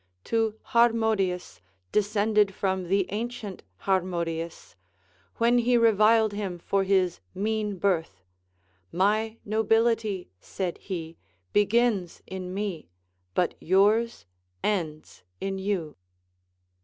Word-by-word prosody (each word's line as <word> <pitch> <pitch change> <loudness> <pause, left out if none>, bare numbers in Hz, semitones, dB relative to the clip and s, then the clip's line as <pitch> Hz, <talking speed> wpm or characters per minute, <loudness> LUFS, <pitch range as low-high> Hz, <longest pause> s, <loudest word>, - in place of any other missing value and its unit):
To 225 -2 0
Harmodius, 220 -6 +2 0.3
descended 210 -1 +2
from 190 -2 -1
the 195 +1 +2
ancient 220 -2 -4 0.2
Harmodius, 170 -3 -2 0.6
when 235 +1 +3
he 240 +1 +3
reviled 220 -1 +4
him 200 -4 -3
for 195 +3 0
his 190 -2 +2 0.2
mean 210 0 -1
birth. 165 - 0 0.7
My 215 +4 +1
nobility, 220 - +1
said 180 - -4
he, 165 -4 -6 0.4
begins 205 -3 +2
in 185 -1 -6
me, 195 -4 -4 0.5
but 180 - +2
yours 205 - +2 0.4
ends 160 -7 -2 0.2
in 195 0 -3
you. 190 -6 -2
200 Hz, 95 wpm, -27 LUFS, 185-220 Hz, 0.7 s, reviled